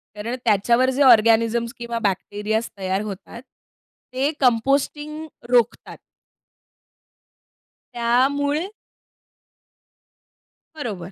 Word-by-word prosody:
कारण 225 +4 -4
त्याच्यावर 235 +4 +3
जे - - +1
ऑर्गॅनिझम्स 230 -1 +4
किंवा 235 -1 -4
बॅक्टेरियाज 210 +2 -2
तयार 190 0 -2
होतात, 210 +2 -8
ते 260 +1 -7
कंपोस्टिंग 280 +5 0 0.2
रोखतात. 240 -2 +1 2.0
त्यामुळे 285 +7 +1 2.1
बरोबर. 200 - -6
235 Hz, 70 wpm, -22 LUFS, 215-265 Hz, 2.1 s, ऑर्गॅनिझम्स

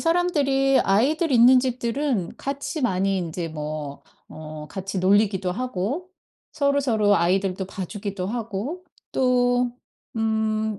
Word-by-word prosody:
사람들이 285 -6 +2
아이들 280 - +2
있는 250 +2 +7
집들은 245 - -1
같이 280 +2 -4
많이 195 -3 +1
인제 170 -1 -4
뭐 150 -2 -6 0.3
어 155 -1 -8
같이 190 0 -4
놀리기도 195 -1 +2
하고 255 - -3 0.4
서로서로 265 -8 +2
아이들도 185 +2 0
봐주기도 195 0 -5
하고. 230 - -4 0.3
또 245 -1 +2 0.5
음 220 -1 0
220 Hz, 245 characters per minute, -24 LUFS, 190-265 Hz, 0.5 s, 있는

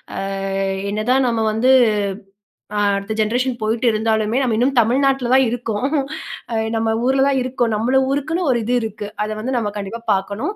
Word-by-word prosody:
ஆ - - -5 0.7
என்னதான் 250 +6 +1
நம்ம 230 -2 0
வந்து 235 +5 +2 1.0
அ, - - +1 0.2
அடுத்த 200 +2 -4
ஜென்ரேஷன் 245 +4 0
போயிட்டு 225 +3 -1
இருந்தாலுமே, 220 +1 0
நம்ம 245 -4 +1
இன்னும் 260 +3 +2
தமிழ்நாட்ல 260 +2 +2
தான் 265 - +6
இருக்கோம் 230 0 -2 0.7
அ, - - -1 0.2
நம்ம 225 0 0 0.2
ஊர்ல 265 +1 +3
தான் 275 -1 +2
இருக்கோம். 245 -2 -1
நம்மள 245 +5 +1
ஊருக்குன்னு 310 +6 -1
ஒரு 240 - +2
இது 240 +3 -1
இருக்கு. 215 -2 -5 0.2
அத 215 - -3
வந்து 250 +5 -3
நம்ம 215 -3 -1
கண்டிப்பா 205 +3 -5
பார்க்கணும் 200 - -2
235 Hz, 165 wpm, -19 LUFS, 215-260 Hz, 1.0 s, தான்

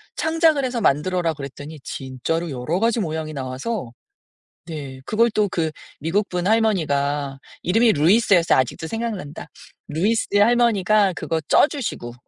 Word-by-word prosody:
창작을 320 -3 +2
해서 245 -2 -2
만들어라." 170 +3 +1
그랬더니 145 +1 -9
진짜로 140 +6 -3
여러 145 +7 -2
가지 230 +1 +1
모양이 155 -2 -3
나와서. 135 - -4 0.7
네. 140 -5 -7
그걸 230 +2 +2
또 210 -1 +1
그 160 -2 -1 0.3
미국분 180 +2 -1
할머니가 145 -11 +1 0.3
이름이 225 +6 +4
루이스였어요. 175 - +4
아직도 130 +5 -2
생각난다. 220 -9 -5 0.4
루이스의 205 +5 +1
할머니가 215 -3 +3
그거 165 - -2
쪄 - - +6
주시고. 225 - -5
175 Hz, 330 characters per minute, -22 LUFS, 145-220 Hz, 0.7 s, 쪄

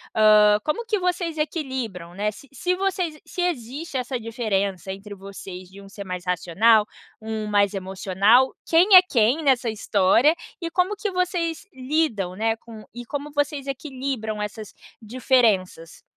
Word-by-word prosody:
Hã, 210 -1 +6
como 385 +10 -2
que 440 -2 0
vocês 355 -2 -2
equilibram, 260 - -4
né. 210 +3 -1
Se 275 +6 -15
se 360 +7 -1
vocês 365 -5 -2
se 365 - -5
existe 290 -2 -3
essa 255 +1 -3
diferença 200 -5 -2
entre 205 +1 -10
vocês 190 -2 -10
de 195 +1 -13
um 195 - -14
ser 200 0 -9
mais 180 -1 -5
racional, 195 +5 +3 0.4
um 220 -1 -4
mais 205 -1 +2
emocional, 195 +6 +2
quem 360 +5 +5
é 365 - +12
quem 265 -2 +1
nessa 255 -4 +2
história, 215 +6 +3 0.3
e 335 - -3
como 365 +4 +1
que 415 -1 -3
vocês 360 -1 -2
lidam, 255 - -1
né, 225 +2 0
com 225 -1 -13
e 240 - -7
como 285 +4 -5
vocês 290 -1 -1
equilibram 260 -6 -4
essas 210 0 -7 0.3
diferenças, 220 - 0
230 Hz, 150 wpm, -23 LUFS, 205-305 Hz, 0.4 s, é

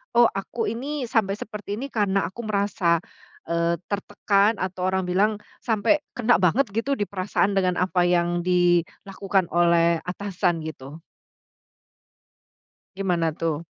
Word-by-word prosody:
"Oh, 240 0 +7
aku 220 +4 -3
ini 275 +4 -4
sampai 220 -4 0
seperti 210 -1 -6
ini 270 +5 -6
karena 200 -3 +1
aku 235 +7 -8
merasa, 190 -5 +1 0.4
eee, 170 0 0 0.2
tertekan," 205 +1 +1
atau 185 -1 -3
orang 190 0 0
bilang, 195 +4 +1 0.2
"sampai 225 +6 +2 0.2
kena 245 -3 +3
banget 200 +7 +2
gitu 230 +7 -1
di 210 - -1
perasaan, 200 +1 0
dengan 185 -2 +2
apa 180 -1 +1
yang 175 0 +1
dilakukan 180 +2 0
oleh 170 -1 +3
atasan." 180 -3 -1
Gitu? 155 0 -9 1.9
Gimana 175 -4 0
tuh? 160 0 -3
190 Hz, 125 wpm, -24 LUFS, 175-210 Hz, 1.9 s, Oh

